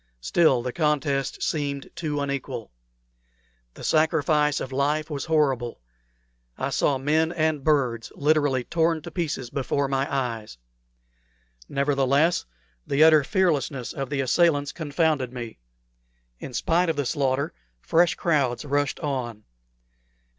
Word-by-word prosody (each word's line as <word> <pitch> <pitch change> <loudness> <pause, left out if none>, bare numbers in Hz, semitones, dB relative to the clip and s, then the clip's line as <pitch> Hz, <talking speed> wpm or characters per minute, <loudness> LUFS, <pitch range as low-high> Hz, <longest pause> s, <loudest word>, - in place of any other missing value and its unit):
Still, 130 - +3
the 125 0 -3
contest 145 -4 0
seemed 140 -3 -2
too 150 -3 -2
unequal. 140 - -4 1.0
The - - -11
sacrifice 155 -2 +2
of 130 - -5
life 150 +4 0
was 140 -2 -3
horrible. 135 - +1 0.8
I - - -2
saw 140 - +2
men 155 +4 +1
and 155 -4 0
birds 130 -7 +1
literally 145 -3 +2
torn 165 +1 0
to - - -8
pieces 150 -8 -3
before 140 0 -1
my 135 0 -1
eyes. 115 - -3 1.1
Nevertheless, 140 +3 +2 0.4
the 140 +3 +4
utter 155 -2 +7
fearlessness 145 - 0
of 135 -2 -4
the 140 -2 -1
assailants 145 +1 +2
confounded 150 -4 0
me. 120 - -7 0.8
In 125 - -8
spite 170 +6 +2
of 165 - 0
the 145 -1 -1
slaughter, 135 +1 0 0.3
fresh 170 - +2
crowds 145 -5 0
rushed 145 0 0
on. 125 -7 -3
145 Hz, 125 wpm, -25 LUFS, 135-155 Hz, 1.1 s, utter